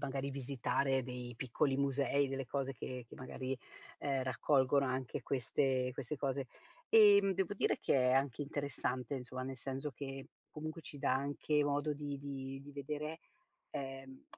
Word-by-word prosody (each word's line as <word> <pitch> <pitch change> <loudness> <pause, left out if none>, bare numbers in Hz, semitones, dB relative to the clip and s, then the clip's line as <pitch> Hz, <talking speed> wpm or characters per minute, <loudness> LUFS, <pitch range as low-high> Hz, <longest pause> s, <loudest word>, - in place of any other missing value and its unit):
magari 140 0 -2
visitare 135 0 +1
dei 125 -1 -5
piccoli 135 +3 +1
musei, 140 0 +2
delle 135 -1 -3
cose 135 +1 -1
che 125 -2 -6
che - - -12
magari, 130 +1 -4 0.4
ehm, 135 -2 0
raccolgono 135 +1 +3
anche 130 -1 -2
queste 130 0 +1
queste 135 +3 -4
cose. 135 -1 -1 0.4
Ehm, 200 -3 +8
devo 190 +1 0
dire - - +2
che - - +2 0.2
è - - +4
anche 135 +1 +2
interessante 140 -3 -2
insomma, 130 -1 -4
nel 135 0 -4
senso 135 +3 -4
che 135 +1 -6 0.2
comunque 155 +2 -5
ci 145 - -8
dà 130 - +2
anche 145 +2 +1
modo 145 +1 +1
di 145 -1 -4
di 135 -1 -5
di 145 +1 -11
vedere, 150 +3 -4 0.5
ehm, 135 -1 -6
135 Hz, 155 wpm, -36 LUFS, 130-145 Hz, 0.5 s, Ehm